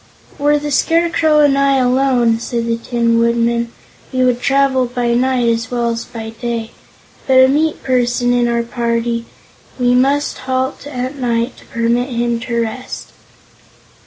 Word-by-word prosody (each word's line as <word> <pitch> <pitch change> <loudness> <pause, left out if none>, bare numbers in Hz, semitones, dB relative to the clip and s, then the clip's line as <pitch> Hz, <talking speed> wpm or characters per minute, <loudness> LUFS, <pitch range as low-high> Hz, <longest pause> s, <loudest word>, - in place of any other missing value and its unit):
"Were 295 +1 +3
the 295 0 -4
Scarecrow 325 0 +2
and 285 -2 +4
I 275 -1 +3
alone," 250 -2 +2
said 235 0 -3
the 230 0 -1
Tin 230 0 0
Woodman, 235 0 +1 0.4
"we 255 -1 +1
would 245 -1 +1
travel 270 -1 +2
by 240 -1 -1
night 250 0 +1
as 230 -1 0
well 240 -1 -1
as 230 0 -4
by 225 -1 -7
day; 230 0 -4 0.6
but 265 - +3
with 260 - +8
a - - +3
meat 310 +1 0
person 245 -1 +1
in 245 -1 +2
our 235 0 0
party, 235 0 -2 0.5
we 245 0 +3
must 275 +3 +1
halt 260 +2 -2
at 260 0 -4
night 240 -1 -1
to - - -17
permit 235 +2 0
him 235 -1 -1
to 235 0 -3
rest." 230 +3 -7
245 Hz, 160 wpm, -16 LUFS, 235-265 Hz, 0.6 s, with